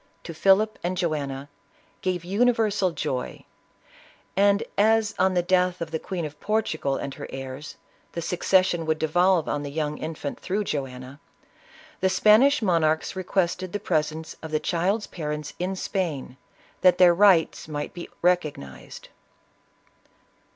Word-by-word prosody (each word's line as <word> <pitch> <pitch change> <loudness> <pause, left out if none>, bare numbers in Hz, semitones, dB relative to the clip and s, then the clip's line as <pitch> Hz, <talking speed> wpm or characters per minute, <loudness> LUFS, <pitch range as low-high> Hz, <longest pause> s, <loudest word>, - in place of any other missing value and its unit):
to 165 - -7
Philip 195 +6 +3
and 180 +1 -2
Joanna, 145 -6 -2 0.5
gave 180 -2 -2
universal 210 -1 +2
joy, 145 -5 -4 0.9
and 200 +2 +3
as, 220 +1 +3
on 190 0 +3
the 175 - +2
death 180 0 +2
of 165 -2 -5
the 160 - -2
Queen 175 -1 -4
of 150 -1 -9
Portugal 160 -10 -1
and 140 - -5
her - - -8
heirs, 135 +3 -7 0.4
the 170 - -3
succession 180 -1 +2
would 160 0 +1
devolve 175 +2 +2
on 145 - -1
the 145 - -5
young 150 0 -3
infant 155 -3 -5
through 200 +3 -2
Joanna, 135 -4 -5 0.8
the 190 - +2
Spanish 215 +8 +5
monarchs 160 -3 +1
requested 185 -1 -1
the 205 - -1
presence 160 -3 -2
of 160 - -7
the 155 0 0
child's 190 +7 0
parents 150 -3 -5
in 185 +2 -2
Spain, 160 -10 -3 0.5
that 180 -1 +5
their 180 -1 +7
right 185 -3 +4
might 145 -1 -4
be 175 - -8
recognized. 150 - -2
175 Hz, 140 wpm, -25 LUFS, 150-190 Hz, 0.9 s, their